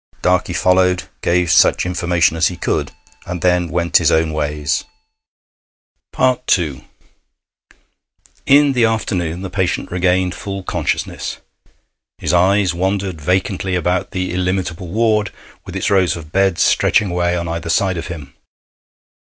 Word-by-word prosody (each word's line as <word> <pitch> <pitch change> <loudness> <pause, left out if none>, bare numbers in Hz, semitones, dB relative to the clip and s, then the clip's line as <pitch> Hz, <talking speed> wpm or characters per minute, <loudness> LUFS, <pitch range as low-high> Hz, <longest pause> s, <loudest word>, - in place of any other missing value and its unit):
Darkey 90 -1 +1
followed, 90 0 +2 0.2
gave 85 0 +1
such 80 - +4
information 85 -2 +1
as 80 +1 +3
he 90 - -5
could, - - -2 0.4
and 90 -1 -5
then 90 -1 +2
went 85 0 +2
his - - +2
own 80 0 +1
ways. 75 -1 -1 1.7
II 75 -7 -5 1.6
In 145 +1 +5
the 125 -2 +2
afternoon 95 -6 -1
the 95 - -6
patient 95 -2 -2
regained 90 0 +1
full 100 -2 -6
consciousness. - - -3 0.8
His - - -2
eyes 95 +1 +3
wandered 95 -1 -2
vacantly 95 +3 -1
about 90 +1 -1
the 90 -1 -3
illimitable 90 -1 -2
ward, 105 +1 +1 0.4
with - - -8
its - - -1
rows 95 -3 +3
of 80 -2 -10
beds 95 -2 +2
stretching 100 -4 +2
away 90 0 0
on 85 0 -3
either 85 0 -4
side 95 +2 +1
of 80 - -5
him. 75 -5 -8
90 Hz, 135 wpm, -18 LUFS, 85-95 Hz, 1.7 s, In